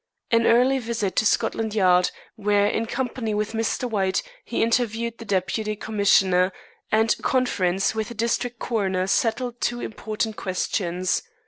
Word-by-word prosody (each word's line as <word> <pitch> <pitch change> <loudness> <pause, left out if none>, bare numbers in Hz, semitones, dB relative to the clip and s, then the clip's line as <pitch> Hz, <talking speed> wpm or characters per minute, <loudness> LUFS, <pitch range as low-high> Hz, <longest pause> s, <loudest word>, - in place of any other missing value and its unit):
An 230 0 +4
early 255 +3 +4
visit 225 -5 -2
to 215 - +4
Scotland 220 -1 0
Yard, 180 -3 +4 0.3
where, 205 -2 +2
in 220 +2 0
company 240 -3 -2
with 210 0 -1
Mr. 225 +2 -1
White, 195 - 0 0.2
he - - -1
interviewed 230 0 0
the 230 - -8
Deputy 210 +2 -1
Commissioner, 195 -3 +3 0.4
and 220 +1 +4
a - - -12
conference 195 -7 +1
with 220 -1 -2
the 235 - -8
district 235 +1 -1
coroner 190 -6 -1
settled 235 +4 0
two 240 0 0
important 220 -1 -4
questions. 180 -1 -1
220 Hz, 145 wpm, -24 LUFS, 195-230 Hz, 0.4 s, An